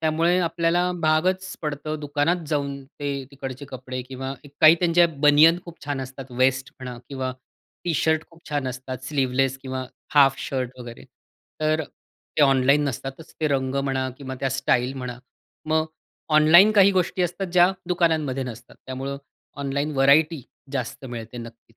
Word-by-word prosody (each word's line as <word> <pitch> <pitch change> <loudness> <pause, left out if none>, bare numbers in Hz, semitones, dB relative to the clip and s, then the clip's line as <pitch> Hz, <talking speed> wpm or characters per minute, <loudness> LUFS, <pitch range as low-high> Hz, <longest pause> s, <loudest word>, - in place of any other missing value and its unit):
त्यामुळे 165 +3 +2
आपल्याला 170 +1 +1
भागच 180 +4 +1
पडतो 150 0 -3
दुकानात 150 +3 0
जाऊन 140 -2 -2
ते 145 +1 -5 0.2
तिकडचे 135 0 -7
कपडे 130 -1 -6
किंवा 130 +1 -6 0.3
काही 155 +1 +9
त्यांच्या 175 0 +5 0.2
बनियन 155 +4 +7
खूप 170 -4 -12
छान 145 -2 -2
असतात 130 0 -8
वेस्ट 130 +1 +2
म्हणा 125 -1 -6
किंवा 130 -2 -3 0.5
टी-शर्ट 160 -1 +1
खूप 165 0 -19
छान 145 -3 -1
असतात 130 0 -7
स्लीवलेस 135 -1 0
किंवा 130 -1 -4 0.3
हाफ 135 -2 +6
शर्ट 130 -2 -4
वगैरे. 120 -1 -9 0.6
तर 155 +1 +2
अ, - - -3 0.5
ते 150 - +4
ऑनलाईन 140 +1 +4
नसतातच, 135 +5 -7
ते 155 - +2
रंग 135 -1 0
म्हणा 130 -1 -1
किंवा 130 -2 -6
त्या 135 - +1
स्टाईल 130 -1 +1
म्हणा. 125 -2 -6 0.5
मग 160 0 +1 0.5
ऑनलाईन 170 +7 +7
काही 200 -2 +6
गोष्टी 180 0 0
असतात, 180 +3 -2
ज्या 180 +1 +5 0.2
दुकानांमध्ये 160 -7 +1
नसतात. 120 -1 -10
त्यामुळं 135 +2 -4 0.5
ऑनलाईन 140 +2 -1
व्हरायटी 145 +2 +4 0.3
जास्त 135 +1 -4
मिळते 120 -1 -7
नक्कीच. 115 -1 -12
140 Hz, 150 wpm, -24 LUFS, 130-160 Hz, 0.6 s, काही